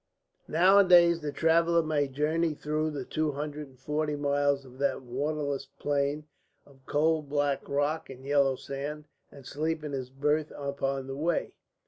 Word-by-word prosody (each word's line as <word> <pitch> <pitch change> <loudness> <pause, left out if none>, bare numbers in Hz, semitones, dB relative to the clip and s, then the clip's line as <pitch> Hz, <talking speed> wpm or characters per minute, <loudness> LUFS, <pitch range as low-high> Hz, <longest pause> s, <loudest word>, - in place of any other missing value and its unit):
Nowadays 175 -1 +6
the 150 -1 -3
traveller 165 +3 +3
may 150 -2 0
journey 155 +4 0
through 155 +1 -1
the 140 -4 -5
two 155 +1 -1
hundred 150 +1 -5
and 130 -1 -20
forty 150 +2 -1
miles 140 -1 +1
of 130 0 -15
that 140 -1 0
waterless 140 +2 -2
plain 145 +1 -1 0.4
of 135 -2 -21
coal 155 +2 +2
black 145 -1 -1
rocks 145 +3 -1
and 130 0 -11
yellow 140 -1 +3
sand, 145 +3 -6 0.3
and 140 -2 -14
sleep 155 +3 -2
in 150 - -5
his 130 -2 -4
berth 150 +3 0
upon 140 -1 -2
the 135 0 -6
way. 160 +4 -1
145 Hz, 155 wpm, -29 LUFS, 140-155 Hz, 0.4 s, Nowadays